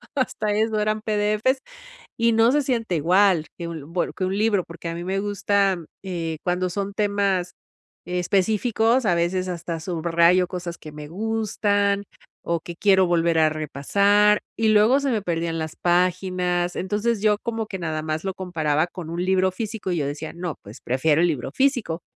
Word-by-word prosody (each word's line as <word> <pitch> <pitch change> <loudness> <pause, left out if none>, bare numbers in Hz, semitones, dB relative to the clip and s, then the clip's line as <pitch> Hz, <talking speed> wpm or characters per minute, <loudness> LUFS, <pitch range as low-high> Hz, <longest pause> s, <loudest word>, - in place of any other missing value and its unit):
hasta 255 -5 -1
eso 215 +1 +1
eran 215 0 0
PDFs, 215 +5 +1 0.6
y 230 0 +3
no 225 +1 +4
se 290 +2 +2
siente 230 -9 -1
igual 175 0 +3
que 170 -1 -5
un 160 -1 -8
bueno 175 - -1
que 185 - -2
un 190 +2 -1
libro, 210 -4 +2
porque 170 0 -8
a 165 - -3
mí 170 +1 -5
me 190 +1 -1
gusta, 200 -1 +1 0.3
eh, 170 -4 -4
cuando 180 0 0
son 200 +1 -3
temas 200 -3 0 0.5
específicos, 215 +6 +1
a 175 - +3
veces 185 +2 0
hasta 170 -2 -4
subrayo 170 +1 +2
cosas 175 -1 -6
que 155 - -11
me 150 -1 -9
gustan, 205 0 0 0.4
o 170 -1 -1
que 170 +1 -9
quiero 190 -1 +4
volver 170 -1 +2
a 155 -1 +5
repasar, 200 +8 +2 0.2
y 225 -1 +2
luego 215 +6 +5
se 275 -1 0
me 215 -4 0
perdían 165 -2 -2
las 160 -1 -4
páginas. 180 0 0
Entonces, 210 +3 -1
yo 210 -1 +3
como 225 -2 -2
que 190 -2 -6
nada 160 -2 -3
más 155 0 -3
lo 190 -1 -2
comparaba 160 -4 0
con 175 -2 -8
un 170 +2 -3
libro 190 0 +2
físico, 215 0 -4
y 175 - 0
yo 140 - -1
decía: 150 +3 -5
"No, 175 -2 -4
pues 105 +5 -12
prefiero 145 +6 +2
el 175 - +4
libro 145 -7 -3
físico", 245 - 0
185 Hz, 180 wpm, -23 LUFS, 170-210 Hz, 0.6 s, a